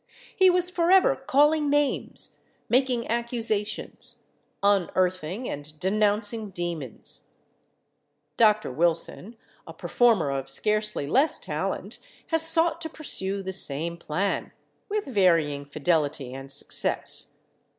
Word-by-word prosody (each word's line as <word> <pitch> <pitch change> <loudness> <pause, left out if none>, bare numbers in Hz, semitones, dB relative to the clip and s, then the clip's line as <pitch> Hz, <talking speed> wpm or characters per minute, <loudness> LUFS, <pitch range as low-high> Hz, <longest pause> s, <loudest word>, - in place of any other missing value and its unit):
He 375 -1 +6
was 360 0 +2
forever 360 +2 +4
calling 295 +3 +2
names, 290 -1 0 0.3
making 250 -2 +1
accusations, 230 -3 -2 0.4
unearthing 185 +1 +1
and 150 +1 -7
denouncing 210 +2 0
demons. 170 - -5 1.1
Dr. 215 - +3
Wilson, 170 - -1 0.3
a - - -10
performer 225 - +2
of 135 0 -3
scarcely 210 +2 -1
less 270 - +2
talent, - - -4 0.3
has 325 -1 +2
sought 325 0 +4
to 320 - -3
pursue 195 -11 -3
the 190 0 -4
same 170 -1 +2
plan, 175 +4 -2 0.4
with 420 0 -1
varying 165 - +2
fidelity 145 -3 -1
and 135 +1 -8
success. 140 - -2
205 Hz, 105 wpm, -26 LUFS, 165-260 Hz, 1.1 s, He